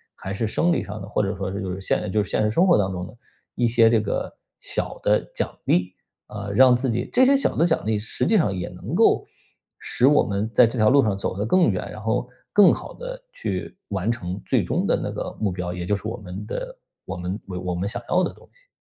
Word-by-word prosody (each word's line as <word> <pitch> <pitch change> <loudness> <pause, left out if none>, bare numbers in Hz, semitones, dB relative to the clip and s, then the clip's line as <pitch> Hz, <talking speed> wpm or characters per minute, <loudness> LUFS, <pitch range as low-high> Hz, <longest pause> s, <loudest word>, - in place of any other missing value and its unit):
还 95 - -6
是 110 +3 -1
生 170 +10 +1
理 - - 0
上 105 +2 -7
的， 95 - -7
或 105 - 0
者 100 0 -1
说 95 0 -4
就 95 -1 -4
是 95 - -6
现 105 - -1
就 105 0 +2
是 100 - -9
现 - - +1
实 105 - +2
生 170 - +3
活 175 - +6
当 95 -2 +1
中 90 0 -4
的 110 - -14 0.4
一 120 - +2
些 115 -1 +5
这 115 -1 +4
个 100 - -3 0.3
小 - - -3
的 - - +4 0.2
奖 - - -2
励， 90 +1 +1 0.3
啊， 100 -1 -6
让 130 +1 +7
自 130 +2 -1
己 115 +1 -1
这 255 - +5
些 275 +2 +5
小 - - 0
的 165 - +3
奖 160 -9 +1
励 110 -1 +1
实 110 - -2
际 220 - +3
上 155 - +2
也 90 -1 -3
能 - - -6
够 - - +4 0.5
使 125 - +1
我 145 +1 +5
们 100 +2 -2
在 125 - +8
这 115 +1 -2
条 110 0 +5
路 140 +1 +5
上 105 -3 +1
走 100 -1 -3
得 105 - -1
更 180 +5 +4
远， 95 -3 -2
然 105 - -8
后 115 +3 -1 0.2
更 205 -1 +7
好 - - -7
地 - - -7
去 - - -4
完 100 +2 -1
成 95 -4 -4
最 - - +1
终 - - -1
的 - - +3
那 - - -3
个 - - -4
目 105 -3 0
标， 90 -1 -4
也 90 0 -5
就 105 - +1
是 100 - -5
我 115 +2 -4
们 95 -2 -8
的 - - -5 0.3
我 95 - -5
们 90 +3 -4
我 90 -1 -4
们 90 +3 -2
想 120 - -4
要 185 +1 +3
的 - - -2
东 - - -19
西。 - - -26
105 Hz, 280 characters per minute, -23 LUFS, 95-125 Hz, 0.5 s, 在